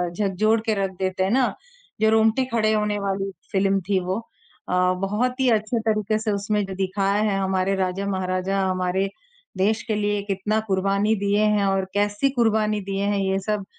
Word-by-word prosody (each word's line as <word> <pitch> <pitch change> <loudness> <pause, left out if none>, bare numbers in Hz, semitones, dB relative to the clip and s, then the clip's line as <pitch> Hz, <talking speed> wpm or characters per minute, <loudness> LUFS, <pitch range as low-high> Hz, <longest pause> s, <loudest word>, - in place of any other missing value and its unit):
झकझोर 215 +3 +1
के 220 - +2
रख 190 - -2
देते 185 0 0
हैं 190 - 0
ना, 255 0 +2 0.5
जो 220 - +5
रोंगटे 220 +3 +3
खड़े 220 -1 +2
होने 210 -1 0
वाली 195 0 -2 0.2
फ़िल्म 195 -1 +2
थी 195 -2 +3
वो। 185 +3 -1
अ, 320 - -15 0.3
बहुत 240 +7 -1
ही 255 - +4
अच्छे 220 +1 +1
तरीके 215 0 +1
से 215 -1 -1
उसमें 205 +1 0
जो 190 - -7
दिखाया 195 +2 0
है 195 - 0
हमारे 190 0 0
राजा-महाराजा 190 0 -1
हमारे 185 +1 0 0.5
देश 215 +4 +1
के 220 - 0
लिए 205 0 0
कितना 205 +2 0
कुर्बानी 200 +3 +1
दिए 205 +1 +2
हैं 210 -1 +2
और 195 -1 +1
कैसी 205 +6 +1
कुर्बानी 215 -2 +2
दिए 195 +1 -3
हैं, 205 0 +1
ये 195 0 0
सब 205 0 -2
200 Hz, 180 wpm, -23 LUFS, 195-215 Hz, 0.5 s, जो